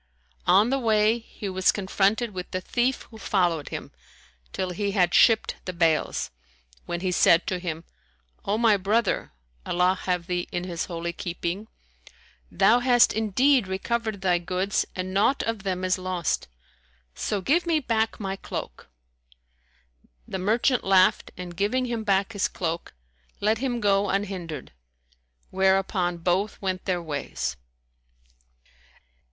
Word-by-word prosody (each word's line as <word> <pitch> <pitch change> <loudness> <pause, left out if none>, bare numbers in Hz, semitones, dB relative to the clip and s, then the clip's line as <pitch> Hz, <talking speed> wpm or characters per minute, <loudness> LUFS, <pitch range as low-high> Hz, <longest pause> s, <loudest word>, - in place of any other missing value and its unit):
On 205 +6 +5
the 275 - +1
way, 220 -1 +3
he 220 -2 -8
was 185 -1 +2
confronted 205 +3 0
with 180 -1 -6
the 185 - -2
thief 245 +7 -1
who 220 - -12
followed 175 -7 0
him, - - -6 0.6
till 185 -1 -3
he 200 +2 -2
had 180 -4 +2
shipped 225 -2 +4
the 185 - -4
bales, 165 -2 +1 0.6
when 175 0 -3
he 185 -1 0
said 170 0 +4
to 185 - -2
him, 165 -2 -4 0.6
"O 205 +2 0
my 225 -3 +4
brother 205 +3 0 0.3
(Allah 180 +1 +2
have 180 -2 0
thee 180 -1 -2
in 175 - -2
His 175 -2 -3
holy 170 -1 -4
keeping!), 175 +4 -4 0.8
thou 230 +5 +4
hast 245 -1 +4
indeed 230 +3 +2
recovered 220 +2 -2
thy 180 -2 +2
goods 185 +3 -1
and 185 0 -4
naught 220 +8 +2
of 225 -2 -2
them 185 -2 -2
is 185 0 +1
lost; 185 -3 -2 0.7
so 205 - -2
give 320 - +1
me 325 -2 +3
back 225 -4 -1
my 195 -2 -3
cloak." - - -7 1.4
The 190 - -4
merchant 230 +6 +2
laughed 190 -1 +4
and, 180 -1 -7
giving 210 +8 0
him 235 -2 -3
back 200 +1 +1
his 205 - +1
cloak, 170 - -4 0.4
let 215 +2 +1
him 250 -2 -1
go 200 -2 +2
unhindered; 185 -7 -3 0.8
whereupon 190 -2 +1
both 180 +4 0
went 185 -2 -3
their 180 -3 -1
ways. 145 -3 -3
195 Hz, 140 wpm, -25 LUFS, 180-220 Hz, 1.4 s, On